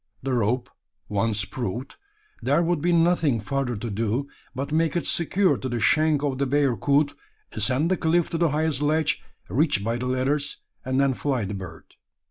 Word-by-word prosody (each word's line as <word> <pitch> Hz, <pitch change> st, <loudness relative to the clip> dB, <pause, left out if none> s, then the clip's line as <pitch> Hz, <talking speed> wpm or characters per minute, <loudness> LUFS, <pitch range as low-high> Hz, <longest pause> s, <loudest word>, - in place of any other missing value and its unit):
The 135 Hz, -1 st, -1 dB
rope 120 Hz, +1 st, +1 dB, 0.4 s
once 105 Hz, 0 st, 0 dB
proved, 120 Hz, +4 st, -5 dB, 0.5 s
there 170 Hz, -, +2 dB
would 170 Hz, -3 st, 0 dB
be 175 Hz, +2 st, +2 dB
nothing 165 Hz, -7 st, +3 dB
further 130 Hz, +2 st, -2 dB
to 115 Hz, +3 st, -4 dB
do, 115 Hz, +6 st, -1 dB, 0.3 s
but 140 Hz, +3 st, -3 dB
make 160 Hz, +2 st, +1 dB
it 175 Hz, -, 0 dB
secure 185 Hz, +3 st, +2 dB
to 130 Hz, -, -4 dB
the 120 Hz, -1 st, -2 dB
shank 155 Hz, +5 st, +3 dB
of 135 Hz, -2 st, -1 dB
the 140 Hz, -, +1 dB
bearcoot; 140 Hz, +1 st, +2 dB, 0.4 s
ascend 140 Hz, +7 st, 0 dB
the 185 Hz, -, +2 dB
cliff 165 Hz, +1 st, +2 dB
to 165 Hz, -, -2 dB
the 170 Hz, -2 st, +3 dB
highest 150 Hz, -1 st, 0 dB
ledge, 155 Hz, +1 st, +1 dB, 0.3 s
reached 135 Hz, -, +1 dB
by 115 Hz, +2 st, -1 dB
the 125 Hz, +1 st, -3 dB
ladders; 135 Hz, +3 st, 0 dB, 0.3 s
and 130 Hz, +1 st, 0 dB
then 140 Hz, -1 st, +3 dB
fly 130 Hz, -4 st, -1 dB
the 100 Hz, -, -4 dB
bird. 90 Hz, -5 st, -8 dB
140 Hz, 180 wpm, -25 LUFS, 120-155 Hz, 0.5 s, nothing